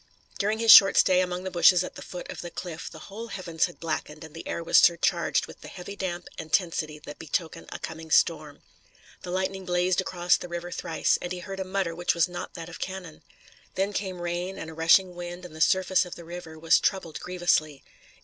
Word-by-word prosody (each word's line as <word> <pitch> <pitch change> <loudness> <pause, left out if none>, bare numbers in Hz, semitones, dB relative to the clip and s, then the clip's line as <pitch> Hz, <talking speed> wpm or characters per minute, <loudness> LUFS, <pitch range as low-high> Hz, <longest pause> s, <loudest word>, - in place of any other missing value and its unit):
During 210 +2 +1
his 225 0 +6
short 195 -3 +10
stay 185 -1 +5
among 180 0 -3
the 190 - -4
bushes 180 +1 +5
at - - -7
the - - -10
foot 180 - -8
of - - -7
the 175 - -6
cliff 170 -2 -7
the - - -12
whole 220 +4 -8
heavens 175 -6 -1
had 175 - -14
blackened 155 -1 -4
and 160 -1 -11
the 165 - -9
air 170 - -3
was - - +5
surcharged 170 0 +3
with - - -14
the - - -10
heavy 195 +2 -8
damp 180 -3 -4
and 160 -1 -8
tensity 165 -5 0
that 150 -1 -11
betoken 160 +2 -3
a - - -5
coming 160 0 -8
storm. 155 -2 +1 0.6
The - - -8
lightning 190 +1 -2
blazed 180 +1 +1
across 175 -1 +1
the - - -8
river 175 0 -6
thrice, 165 - 0
and 175 - -5
he 180 - -3
heard 195 +2 -7
a - - -1
mutter 185 -2 -2
which 175 +1 0
was 170 0 +3
not 175 0 -7
that 165 -2 -7
of 175 - -10
cannon. 185 -4 -6 0.5
Then 195 +2 0
came 190 -3 -3
rain 175 +2 -3
and 160 - -7
a - - -10
rushing 170 +3 +4
wind 175 +1 -7
and 165 -3 -11
the 160 - -7
surface 190 +2 +3
of 180 - -8
the 170 - -11
river 165 -2 -9
was 160 +1 +4
troubled 185 -5 -1
grievously. 175 -5 0
175 Hz, 225 wpm, -27 LUFS, 165-185 Hz, 0.6 s, short